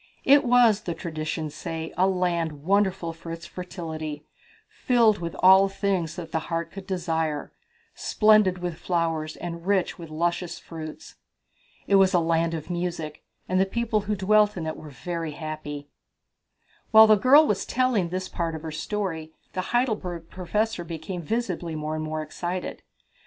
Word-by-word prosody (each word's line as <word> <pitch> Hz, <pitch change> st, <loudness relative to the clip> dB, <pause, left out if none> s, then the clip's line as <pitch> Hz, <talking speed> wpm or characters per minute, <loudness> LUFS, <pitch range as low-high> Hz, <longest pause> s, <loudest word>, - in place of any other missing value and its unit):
"It 280 Hz, +1 st, +6 dB
was, 240 Hz, -4 st, +5 dB
the 170 Hz, -5 st, -4 dB
traditions 155 Hz, -2 st, -4 dB
say, 160 Hz, 0 st, -5 dB
a 185 Hz, -, +3 dB
land 170 Hz, -5 st, -1 dB
wonderful 190 Hz, -2 st, +1 dB
for 165 Hz, 0 st, -9 dB
its 165 Hz, +1 st, -7 dB
fertility, 160 Hz, -4 st, -6 dB, 0.4 s
filled 230 Hz, -4 st, +3 dB
with 170 Hz, -1 st, -5 dB
all 190 Hz, +1 st, +7 dB
things 190 Hz, -5 st, -1 dB
that 165 Hz, -2 st, -7 dB
the 160 Hz, -, 0 dB
heart 165 Hz, -1 st, -2 dB
could 195 Hz, -1 st, -9 dB
desire, 160 Hz, -5 st, -2 dB, 0.4 s
splendid 215 Hz, -4 st, +4 dB
with 175 Hz, -2 st, -4 dB
flowers 165 Hz, -3 st, -1 dB
and 170 Hz, 0 st, -7 dB
rich 195 Hz, -3 st, +1 dB
with 165 Hz, -2 st, -8 dB
luscious 170 Hz, +2 st, -1 dB
fruits." 155 Hz, -2 st, -9 dB, 0.7 s
"It 200 Hz, -, +4 dB
was 190 Hz, -1 st, +4 dB
a -, -, +5 dB
land 165 Hz, 0 st, +1 dB
of 160 Hz, +2 st, -6 dB
music, 170 Hz, -3 st, -3 dB, 0.3 s
and 185 Hz, 0 st, +2 dB
the -, -, +4 dB
people 225 Hz, 0 st, 0 dB
who 210 Hz, +1 st, -2 dB
dwelt 210 Hz, +1 st, +3 dB
in 165 Hz, -, -3 dB
it 160 Hz, -, -3 dB
were 155 Hz, -, -10 dB
very 165 Hz, +3 st, -4 dB
happy." 150 Hz, -2 st, -6 dB, 1.0 s
While 220 Hz, 0 st, +9 dB
the 215 Hz, -1 st, +6 dB
girl 270 Hz, +8 st, +6 dB
was 210 Hz, -9 st, 0 dB
telling 245 Hz, -8 st, +1 dB
this 185 Hz, +1 st, -3 dB
part 165 Hz, -2 st, -3 dB
of 160 Hz, -, -7 dB
her 160 Hz, -, -5 dB
story 160 Hz, -2 st, -3 dB, 0.2 s
the 185 Hz, -, -1 dB
Heidelberg 210 Hz, -9 st, -1 dB
Professor 210 Hz, +2 st, -1 dB
became 170 Hz, +2 st, -6 dB
visibly 180 Hz, -4 st, -2 dB
more 155 Hz, 0 st, -3 dB
and 155 Hz, 0 st, -3 dB
more 155 Hz, 0 st, -3 dB
excited. 175 Hz, +4 st, -5 dB
175 Hz, 160 wpm, -26 LUFS, 160-195 Hz, 1.0 s, While